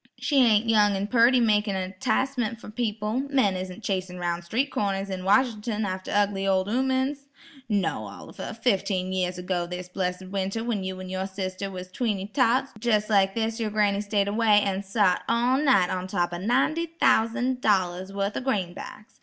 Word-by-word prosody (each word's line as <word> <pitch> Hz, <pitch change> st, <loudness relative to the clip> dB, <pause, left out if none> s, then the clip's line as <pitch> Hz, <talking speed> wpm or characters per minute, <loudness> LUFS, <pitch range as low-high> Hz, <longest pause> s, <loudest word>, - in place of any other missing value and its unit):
She 290 Hz, -, 0 dB
ain't 220 Hz, -1 st, +3 dB
young 210 Hz, -2 st, +4 dB
an' 195 Hz, +1 st, -1 dB
purty 240 Hz, +3 st, +4 dB
makin' 210 Hz, -3 st, +2 dB
a 185 Hz, 0 st, -3 dB
'ticemen' 245 Hz, +2 st, -1 dB
fer 220 Hz, -2 st, -11 dB
people; 215 Hz, 0 st, -2 dB
men 255 Hz, -9 st, +2 dB
isn't 185 Hz, +3 st, -6 dB
chasin 185 Hz, -2 st, -3 dB
'roun' 175 Hz, -1 st, -2 dB
street 240 Hz, +11 st, -1 dB
corners 195 Hz, -1 st, -2 dB
in 185 Hz, -1 st, -4 dB
Wash'nt'n 220 Hz, 0 st, +1 dB
after 185 Hz, -1 st, -4 dB
ugly 200 Hz, -1 st, +1 dB
ol' 190 Hz, 0 st, +2 dB
'oomen's. 265 Hz, +4 st, 0 dB, 0.4 s
No 205 Hz, -3 st, -1 dB
Oliver; 220 Hz, -, -9 dB
fifteen 190 Hz, -5 st, 0 dB
year 180 Hz, -1 st, 0 dB
ago 180 Hz, -1 st, -2 dB
this 180 Hz, 0 st, -6 dB
blessid 185 Hz, 0 st, -3 dB
winter 195 Hz, +3 st, -2 dB
when 225 Hz, -5 st, -2 dB
you 185 Hz, 0 st, -5 dB
and 185 Hz, 0 st, -7 dB
your 190 Hz, 0 st, -2 dB
sister 190 Hz, 0 st, -4 dB
was 185 Hz, -1 st, -8 dB
tweenty 205 Hz, -3 st, -2 dB
tots, 260 Hz, +1 st, +2 dB
jes' 215 Hz, -2 st, +1 dB
like 195 Hz, -1 st, +3 dB
this 225 Hz, 0 st, -1 dB
yer 220 Hz, -2 st, -1 dB
granny 205 Hz, -1 st, +1 dB
stayed 205 Hz, -1 st, 0 dB
away, 210 Hz, 0 st, +4 dB
an' 195 Hz, -1 st, -1 dB
sot 195 Hz, -2 st, +1 dB
all 240 Hz, +3 st, +2 dB
night 255 Hz, -12 st, +3 dB
on 185 Hz, 0 st, -3 dB
top 175 Hz, -2 st, -1 dB
o' 175 Hz, -, -4 dB
ninety 270 Hz, -, +1 dB
thousan' 245 Hz, +3 st, +2 dB
dollars 190 Hz, -3 st, +1 dB
wurth 200 Hz, +1 st, -2 dB
o' -, -, -2 dB
greenbacks. 210 Hz, -3 st, -4 dB
205 Hz, 180 wpm, -26 LUFS, 185-230 Hz, 0.4 s, young